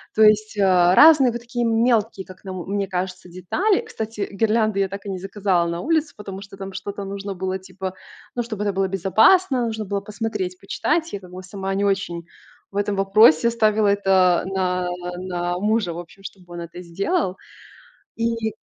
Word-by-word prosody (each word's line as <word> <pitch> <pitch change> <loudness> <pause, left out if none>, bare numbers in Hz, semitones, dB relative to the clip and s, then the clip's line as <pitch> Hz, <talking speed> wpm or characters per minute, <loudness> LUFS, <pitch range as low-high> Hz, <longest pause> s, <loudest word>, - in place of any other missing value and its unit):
То 220 - +5
есть, 215 0 +4
э, 200 - +3 0.3
разные 295 -3 +7
вот 235 - -4
такие 240 0 -2
мелкие, 225 -3 +1
как 185 0 -14
нам 185 -2 -5
мне 200 0 -1
кажется, 180 0 -4
детали. 275 - 0
Кстати, 220 - -5
гирлянды 215 0 +1
я 195 -1 +1
так 200 +1 -8
и - - -5
не 185 - -4
заказала 190 -2 0
на 170 +1 -3
улицу, 320 -1 0
потому 195 -2 -7
что 195 0 -12
там 195 0 -7
что-то 200 +1 -6
нужно 200 0 -5
было, 190 +1 -3
типо, 190 0 -6 0.4
ну, 240 - 0
чтобы 220 -3 -4
это 205 -1 0
было 190 0 +1
безопасно, 235 - +3
нужно 220 -1 -4
было 200 +1 -2
посмотреть, 200 -3 -4
почитать. 320 +11 -1
Я 200 - -3
как 180 -2 -14
бы 185 +1 -9
сама 195 +1 -5
не 200 +1 0
очень 180 -4 -1 0.5
в 200 - -6
этом 205 0 0
вопросе, 195 0 +5
ставила 215 -2 +2
это 190 -3 +3
на 180 -1 -1 0.3
на 175 -1 -3
мужа, 210 -3 0
в 170 - -6
общем, 185 +3 -12
чтобы 180 -3 -11
он 170 - -5
это 170 +1 -8
сделал. 190 - -1 0.8
И 230 -1 -1
195 Hz, 185 wpm, -22 LUFS, 185-220 Hz, 0.8 s, разные